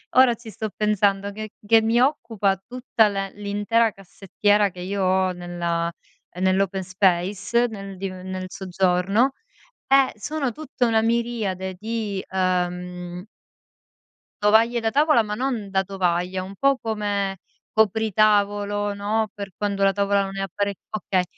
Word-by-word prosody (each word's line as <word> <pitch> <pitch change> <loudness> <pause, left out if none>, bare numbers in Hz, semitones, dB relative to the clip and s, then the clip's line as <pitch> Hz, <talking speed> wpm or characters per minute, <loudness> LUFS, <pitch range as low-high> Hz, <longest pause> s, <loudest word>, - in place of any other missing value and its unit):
ora 255 -1 +7
ci 230 0 -12
sto 215 +2 -4
pensando, 205 -1 +1
che 215 +1 -6 0.2
che 225 0 +6
mi 225 +2 +2
occupa 225 -8 +1
tutta 245 -3 +1
l 200 - -5 0.2
l'intera 205 +3 +1
cassettiera 205 +2 0
che 180 - -12
io 190 +2 -2
ho 185 0 +2
nella 170 -1 -2 0.5
nell' 190 +1 +3
open 190 0 -1
space, 190 +5 +1
nel 195 -3 -8
div 190 0 -4
nel 185 0 -6
soggiorno, 190 +6 +1 0.5
è 270 -1 +5
sono 280 +3 -2
tutta 275 -2 -2
una 225 -1 +3
miriade 225 -5 -1
di, 215 -3 -3
uhm 180 -1 -2 1.2
tovaglie 225 +3 +4
da 225 -1 0
tavola, 295 -2 +4
ma 210 -1 -4
non 235 -5 -2
da 190 0 +2
tovaglia, 185 -1 -1
un 190 +2 -8
po' 275 +3 +3
come 205 -4 -2 0.3
copritavolo, 205 -1 +2
no, 215 +2 -1
per 200 -1 -6
quando 200 -1 -1
la 195 0 +5
tavola 200 0 +2
non 195 0 -6
è 195 - -3
appare 200 +2 -2 0.2
okay, 190 -3 0
200 Hz, 140 wpm, -23 LUFS, 190-220 Hz, 1.2 s, ora